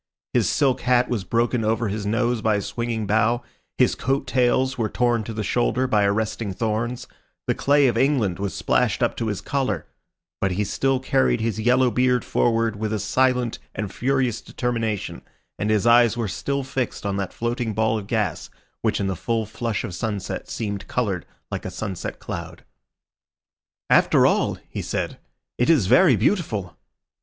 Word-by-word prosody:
His -, -, +2 dB
silk 135 Hz, -3 st, +2 dB
hat 125 Hz, 0 st, +3 dB
was 115 Hz, -6 st, -1 dB
broken 115 Hz, +4 st, 0 dB
over 110 Hz, +1 st, +1 dB
his 100 Hz, 0 st, -3 dB
nose 120 Hz, +1 st, +1 dB
by 110 Hz, -1 st, +2 dB
a 100 Hz, -, 0 dB
swinging 115 Hz, -2 st, -3 dB
bough, 110 Hz, +4 st, +2 dB, 0.3 s
his -, -, +4 dB
coat 135 Hz, +2 st, -1 dB
tails 130 Hz, +1 st, +2 dB
were 110 Hz, -3 st, -1 dB
torn 120 Hz, -1 st, +1 dB
to 115 Hz, -, -5 dB
the 110 Hz, -1 st, -3 dB
shoulder 120 Hz, +4 st, +1 dB
by 105 Hz, -5 st, +2 dB
arresting 105 Hz, 0 st, -1 dB
thorns, 115 Hz, +4 st, -2 dB, 0.4 s
the -, -, +1 dB
clay 145 Hz, 0 st, +3 dB
of 125 Hz, -, +2 dB
England 120 Hz, -10 st, +2 dB
was 100 Hz, -1 st, -3 dB
splashed -, -, +1 dB
up -, -, +1 dB
to 115 Hz, -, -2 dB
his 105 Hz, -3 st, -2 dB
collar; 135 Hz, -2 st, -1 dB, 0.5 s
but 95 Hz, -1 st, 0 dB
he 105 Hz, +3 st, 0 dB
still 135 Hz, +6 st, 0 dB
carried 130 Hz, -2 st, +2 dB
his 110 Hz, -1 st, -1 dB
yellow 125 Hz, +2 st, +3 dB
beard 125 Hz, +1 st, +2 dB
forward 115 Hz, -2 st, +1 dB
with 110 Hz, 0 st, -2 dB
a 110 Hz, -, 0 dB
silent 125 Hz, +3 st, +1 dB, 0.2 s
and 105 Hz, -3 st, -4 dB
furious 130 Hz, -3 st, 0 dB
determination, 115 Hz, -4 st, -3 dB, 0.4 s
and 105 Hz, -, -1 dB
his 110 Hz, 0 st, +2 dB
eyes 120 Hz, 0 st, +5 dB
were 115 Hz, -2 st, -1 dB
still 140 Hz, +8 st, -2 dB
fixed 130 Hz, -4 st, -3 dB
on 100 Hz, -1 st, -1 dB
that 100 Hz, -2 st, -3 dB
floating 120 Hz, 0 st, -2 dB
ball 110 Hz, +1 st, +1 dB
of 100 Hz, -, -9 dB
gas, 105 Hz, -8 st, -1 dB, 0.3 s
which -, -, 0 dB
in 100 Hz, -, 0 dB
the 95 Hz, -1 st, -1 dB
full 115 Hz, +5 st, -1 dB
flush 110 Hz, 0 st, -3 dB
of 90 Hz, -, -5 dB
sunset 100 Hz, +1 st, -4 dB
seemed 100 Hz, -3 st, -4 dB
coloured 100 Hz, -9 st, -1 dB, 0.2 s
like -, -, -3 dB
a -, -, -4 dB
sunset 95 Hz, -3 st, -5 dB
cloud. -, -, -7 dB, 1.2 s
"After -, -, +5 dB
all," -, -, +2 dB
he -, -, -5 dB
said, -, -, -3 dB, 0.4 s
"it 125 Hz, -, +2 dB
is 150 Hz, -, +5 dB
very 150 Hz, -, +6 dB
beautiful!" 110 Hz, -, 0 dB
115 Hz, 175 wpm, -23 LUFS, 105-125 Hz, 1.2 s, very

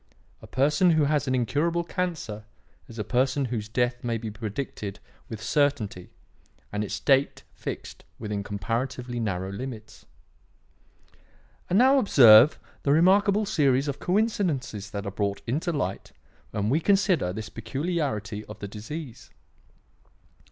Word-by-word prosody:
A -, -, -12 dB
person 150 Hz, +7 st, +3 dB
who 160 Hz, -3 st, +4 dB
has 145 Hz, -1 st, +1 dB
an 130 Hz, -, +1 dB
incurable 155 Hz, +8 st, 0 dB
cancer 165 Hz, -, -4 dB, 0.4 s
is 115 Hz, -, -12 dB
a 105 Hz, -, -2 dB
person 130 Hz, +4 st, +1 dB
whose 110 Hz, -2 st, -3 dB
death 120 Hz, +1 st, 0 dB
may 115 Hz, -1 st, -1 dB
be 110 Hz, -1 st, -5 dB
predicted 105 Hz, -2 st, -5 dB, 0.3 s
with 110 Hz, -1 st, -7 dB
certainty 135 Hz, -, 0 dB, 0.6 s
and 105 Hz, 0 st, -2 dB
its 105 Hz, -, -4 dB
date 135 Hz, -1 st, +2 dB
fixed -, -, -7 dB
within 105 Hz, -2 st, -4 dB
comparatively 120 Hz, +5 st, -3 dB
narrow 95 Hz, -4 st, -2 dB
limits. 110 Hz, +1 st, -8 dB, 1.6 s
"And 185 Hz, -, +3 dB
now 265 Hz, +4 st, +6 dB
observe 130 Hz, -, +7 dB, 0.2 s
the 140 Hz, -, +1 dB
remarkable 200 Hz, +6 st, +4 dB
series 140 Hz, -8 st, +2 dB
of 140 Hz, -1 st, -3 dB
coincidences 180 Hz, -, -1 dB
that 100 Hz, 0 st, -5 dB
are 100 Hz, -, -3 dB
brought 100 Hz, 0 st, -2 dB
into 155 Hz, +9 st, -1 dB
light 145 Hz, -4 st, -3 dB, 0.4 s
when 105 Hz, +2 st, -1 dB
we 150 Hz, -, +3 dB
consider 185 Hz, -, +2 dB
this 110 Hz, +3 st, -6 dB
peculiarity 115 Hz, -, -3 dB
of 105 Hz, -, -10 dB
the 100 Hz, -, -6 dB
disease. 120 Hz, +4 st, -8 dB
125 Hz, 135 wpm, -26 LUFS, 105-155 Hz, 1.6 s, observe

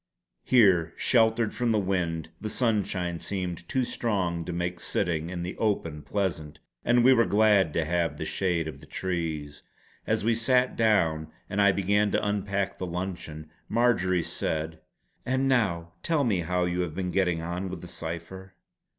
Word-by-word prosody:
Here, 95 Hz, -9 st, +4 dB
sheltered 115 Hz, -2 st, +3 dB
from 120 Hz, -2 st, 0 dB
the 110 Hz, -, +3 dB
wind, 90 Hz, -5 st, -1 dB
the 110 Hz, -, -3 dB
sunshine 100 Hz, -8 st, 0 dB
seemed 90 Hz, -3 st, -4 dB
too 130 Hz, -1 st, +1 dB
strong 95 Hz, -9 st, -1 dB
to 90 Hz, -, -4 dB
make 90 Hz, 0 st, -3 dB
sitting 85 Hz, -3 st, -1 dB
in 90 Hz, -1 st, -4 dB
the 90 Hz, -, -5 dB
open 85 Hz, -8 st, -1 dB
pleasant; 80 Hz, -3 st, -3 dB, 0.3 s
and 120 Hz, 0 st, +4 dB
we 130 Hz, +2 st, +7 dB
were 115 Hz, -4 st, +3 dB
glad 100 Hz, -3 st, +4 dB
to 80 Hz, -, 0 dB
have 85 Hz, +1 st, 0 dB
the -, -, -4 dB
shade 85 Hz, -4 st, 0 dB
of 70 Hz, -3 st, -7 dB
the -, -, -15 dB
trees. 80 Hz, -5 st, -3 dB, 0.5 s
As -, -, +1 dB
we 115 Hz, +2 st, +3 dB
sat 125 Hz, +3 st, +2 dB
down 85 Hz, -9 st, +2 dB, 0.2 s
and 100 Hz, -, +1 dB
I 100 Hz, 0 st, +6 dB
began 100 Hz, +2 st, +2 dB
to -, -, +1 dB
unpack 100 Hz, -1 st, -1 dB
the 95 Hz, -, -3 dB
luncheon, 85 Hz, -4 st, -5 dB, 0.2 s
Marjory 95 Hz, -7 st, +2 dB
said: 80 Hz, 0 st, -3 dB, 0.4 s
"And 130 Hz, +2 st, 0 dB
now 90 Hz, -10 st, +1 dB
tell 160 Hz, -4 st, +1 dB
me 105 Hz, -8 st, +1 dB
how 90 Hz, +1 st, 0 dB
you 90 Hz, 0 st, -1 dB
have 85 Hz, -4 st, -3 dB
been 90 Hz, -1 st, -2 dB
getting 90 Hz, -4 st, +1 dB
on 90 Hz, +3 st, -3 dB
with 90 Hz, -2 st, -6 dB
the 90 Hz, -, -9 dB
cipher." 90 Hz, +3 st, -7 dB
90 Hz, 170 wpm, -27 LUFS, 85-105 Hz, 0.5 s, we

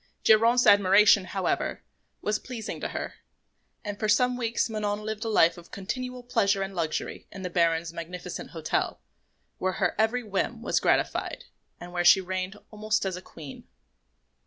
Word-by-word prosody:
Geronte's 230 Hz, +3 st, +5 dB
admiration, 200 Hz, 0 st, +6 dB
however, 190 Hz, 0 st, -2 dB, 0.4 s
was 210 Hz, 0 st, 0 dB
pleasing 240 Hz, -4 st, -6 dB
to -, -, -1 dB
her; -, -, -5 dB, 0.7 s
and 205 Hz, 0 st, -5 dB
for 215 Hz, -, -1 dB
some 250 Hz, +4 st, +3 dB
weeks 235 Hz, -1 st, 0 dB
Manon 210 Hz, -2 st, -2 dB
lived 215 Hz, 0 st, -4 dB
a 225 Hz, -, -2 dB
life 170 Hz, -5 st, +4 dB
of 170 Hz, -, -16 dB
continual 250 Hz, +5 st, -5 dB
pleasure 200 Hz, -5 st, +1 dB
and 195 Hz, 0 st, -6 dB
luxury 165 Hz, -4 st, -3 dB
in 195 Hz, -, -8 dB
the 180 Hz, -, -4 dB
Baron's 165 Hz, -1 st, +1 dB
magnificent 175 Hz, +1 st, -7 dB
hotel, 160 Hz, -2 st, -2 dB, 0.6 s
where 185 Hz, 0 st, 0 dB
her -, -, 0 dB
every 230 Hz, +3 st, +2 dB
whim 225 Hz, +3 st, -2 dB
was -, -, +1 dB
gratified -, -, 0 dB, 0.4 s
and 175 Hz, 0 st, -10 dB
where 175 Hz, -1 st, 0 dB
she 185 Hz, -, +7 dB
reigned 185 Hz, +1 st, -4 dB
almost 215 Hz, 0 st, -1 dB
as 190 Hz, -2 st, -2 dB
a 180 Hz, -, -7 dB
queen. 150 Hz, -6 st, -11 dB
200 Hz, 160 wpm, -27 LUFS, 180-220 Hz, 0.7 s, she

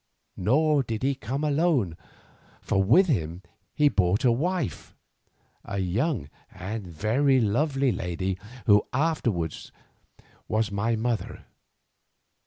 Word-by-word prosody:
Nor 145 Hz, -, +2 dB
did 115 Hz, -3 st, -4 dB
he 140 Hz, +1 st, +2 dB
come 135 Hz, +3 st, -4 dB
alone, 145 Hz, -, +1 dB, 0.6 s
for 95 Hz, -, 0 dB
with 120 Hz, -, +5 dB
him 90 Hz, -, -2 dB, 0.3 s
he 150 Hz, -, +4 dB
brought 100 Hz, -2 st, +2 dB
a 120 Hz, -, +6 dB
wife, 165 Hz, +4 st, -2 dB, 0.7 s
a 100 Hz, -, -5 dB
young 100 Hz, -, -1 dB, 0.2 s
and 100 Hz, +2 st, -6 dB
very 120 Hz, -, +2 dB
lovely 135 Hz, +4 st, +1 dB
lady, 95 Hz, 0 st, -3 dB, 0.3 s
who 105 Hz, 0 st, +5 dB
afterwards 120 Hz, -, -1 dB, 0.8 s
was 110 Hz, -1 st, 0 dB
my 105 Hz, +3 st, 0 dB
mother. 115 Hz, 0 st, -3 dB
115 Hz, 110 wpm, -26 LUFS, 95-140 Hz, 0.8 s, a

